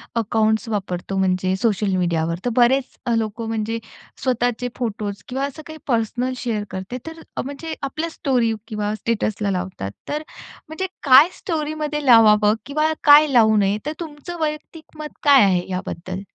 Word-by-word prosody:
Accounts 220 0 +1
वापरतो, 195 -2 -3
म्हणजे 185 0 +1
social 205 -3 +1
मीडियावर 170 -2 0
तर, - - +2
बरेच 255 +2 +2 0.2
लोकं 225 +1 -3
म्हणजे, 225 0 -2 0.4
स्वतःचे 245 -1 0
फोटोज 205 -5 -4
किंवा 265 +2 -2
असं 285 +2 -7
काही 315 0 -9
पर्सनल 245 +1 0
शेअर 225 -4 -2
करते, 190 +6 -5
तर 325 0 -8 0.2
म्हणजे 285 +4 -6
आपल्या 310 +4 -3
स्टोरी 250 -7 0
किंवा 210 -2 -2
स्टेटसला 215 -2 -1
लावतात. 180 - -4 0.2
तर 295 +1 -2 0.5
म्हणजे 350 +5 -4 0.2
काय 285 +4 +8
स्टोरीमध्ये 305 -3 -3
लावावं 215 -4 +6
किंवा 305 +2 0
काय 295 +1 +8
लावू 220 -3 +5
नये, 200 0 +2
तर 300 - -2
तुमचं, 325 +1 -7
वैयक्तिक 310 +1 -5
मत 300 -1 -8
काय 280 -4 +7
आहे 185 -3 +2
याबद्दल? 185 0 -5
230 Hz, 145 wpm, -21 LUFS, 205-290 Hz, 0.5 s, काय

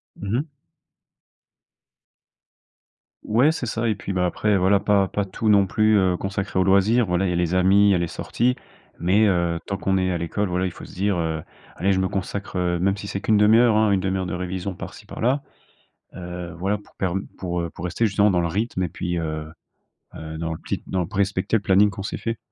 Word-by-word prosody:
Mmh 100 0 -6
mh. 145 +5 -2 2.8
Ouais, 125 +8 +3
c'est 160 - -4
ça 115 0 -1
et 110 - +1
puis, 100 0 -5
bah 90 -1 +1
après, 105 +3 +1
voilà, 95 +2 +3
pas 100 -1 +2
pas 100 +1 -2
tout 105 +3 -2
non 100 -2 +5
plus, 110 +3 +3
heu, 95 -2 +3
consacrer 95 0 -2
aux - - +4
loisirs. 100 +6 +4
Voilà, 90 +2 +1
il - - 0
y - - 0
a - - -1
les 85 0 0
amis, 95 +3 +5
il - - +5
y - - +4
a - - +2
les 85 0 -1
sorties. 125 +9 -1 0.4
Mais 95 +5 +3
heu, 85 -3 +1
tant 100 - -3
qu'on 95 0 0
est 95 0 +1
à 90 - 0
l'école, 85 +5 -2
voilà, 90 +1 0
il 90 - -2
faut - - -11
se - - -13
dire, 100 0 0
heu: 80 -2 -2 0.3
«Allez 95 +4 +1
je 95 - +1
me 95 - +1
consacre, 95 +1 -4
heu» 85 -1 0
même 95 +2 +2
si 100 0 -8
c'est 100 - -3
qu'une 110 0 +3
demi-heure 110 +2 +5
hein, 110 -1 +3
une 100 - +3
demi-heure 95 0 -1
de - - -4
révision 90 +1 -4
par-ci - - -9
par-là. 130 +5 -1 0.7
Heu, 90 -1 -7
voilà, 100 +4 0
pour 100 - -21
perm 95 0 -2
pour, 90 -2 -2
heu, 85 -1 -3
pour 80 - -9
rester 90 +6 0
justement 105 0 +3
dans 90 -2 +2
le 85 - 0
rythme 100 +2 -2
et - - -2
puis, 85 +2 -3
heu, 80 -2 -3 0.7
heu, 80 0 -7
dans 80 0 -3
le 80 - -8
pli - - -4
dans 95 - -1
le 85 - -3
p 105 - -11
respecter 100 +2 +1
le - - -5
planning 100 +1 +4
qu'on 100 -1 -7
s'est - - -4
fait. 115 0 -3
95 Hz, 235 wpm, -23 LUFS, 90-105 Hz, 2.8 s, non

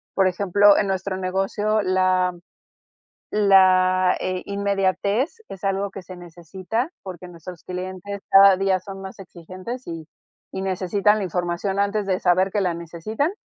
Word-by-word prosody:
Por 195 -1 +3
ejemplo, 200 +2 +4
en 200 - +1
nuestro 190 0 -2
negocio 195 +3 -1
la 185 -1 +1 1.0
la, 185 -2 +4
eh, 185 0 -3
inmediatez 200 - -1
es 195 0 -10
algo 195 +1 -1
que 195 - -9
se 185 +1 -11
necesita, 180 - -5
porque 185 -2 -8
nuestros 175 0 -11
clientes 185 +2 -6
cada 195 0 +8
día 190 0 +1
son 195 +1 -9
más 190 0 -9
exigentes 185 +7 -9
y 165 -2 -7 0.5
y 190 - -4
necesitan 195 +2 +1
la 205 - -2
información 180 +2 -2
antes 200 0 0
de 185 -2 0
saber 185 +2 +2
que 205 - 0
la 180 -2 0
necesitan. 170 - -3
190 Hz, 145 wpm, -22 LUFS, 185-200 Hz, 1.0 s, cada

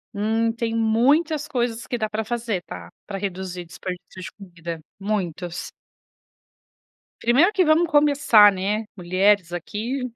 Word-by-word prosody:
Hum, 225 +2 +1
tem 230 -1 -3
muitas 285 +8 +2
coisas 240 -4 -2
que 245 - -2
dá 215 -1 -1
para 220 +1 -3
fazer, 225 -4 -3
tá, 85 -1 -9 0.2
para 195 - -4
reduzir 185 -2 -5
desperdícios 180 +2 -8
de 215 - -7
comida, 170 -4 -8 0.2
muitos. 180 -4 -3 1.5
Primeiro 275 - +4
que 375 - +3
vamos 320 +2 +4
começar, 285 -9 +6
né. 205 +3 -2
Mulheres 185 0 +2
aqui, 220 +9 -4
215 Hz, 130 wpm, -23 LUFS, 185-240 Hz, 1.5 s, começar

